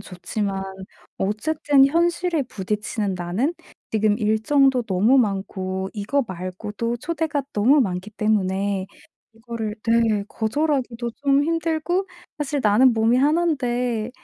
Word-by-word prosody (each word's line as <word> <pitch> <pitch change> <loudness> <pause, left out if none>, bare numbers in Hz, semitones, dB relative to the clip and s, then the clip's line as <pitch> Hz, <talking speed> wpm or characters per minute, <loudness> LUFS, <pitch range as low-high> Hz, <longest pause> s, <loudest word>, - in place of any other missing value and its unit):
좋지만 195 +1 -4 0.6
어쨌든 270 +7 +2
현실에 340 0 +1
부딪히는 210 -2 -3
나는 180 - -1 0.4
지금 215 -1 +2
일정도 250 +5 +3
너무 220 +5 +3
많고 190 -3 -2
이거 235 +6 -1
말고도 205 +6 -4
초대가 310 +1 -2
너무 260 +8 +4
많기 185 -2 -2
때문에 200 -2 0 0.5
이거를 225 -2 -5
네, 225 -3 +2
거절하기도 245 -1 -1
좀 280 0 +3
힘들고 330 +3 0 0.3
사실 290 -1 -1
나는 220 +5 +5
몸이 225 +2 +3
하난데 250 -7 +1
230 Hz, 255 characters per minute, -23 LUFS, 205-280 Hz, 0.6 s, 나는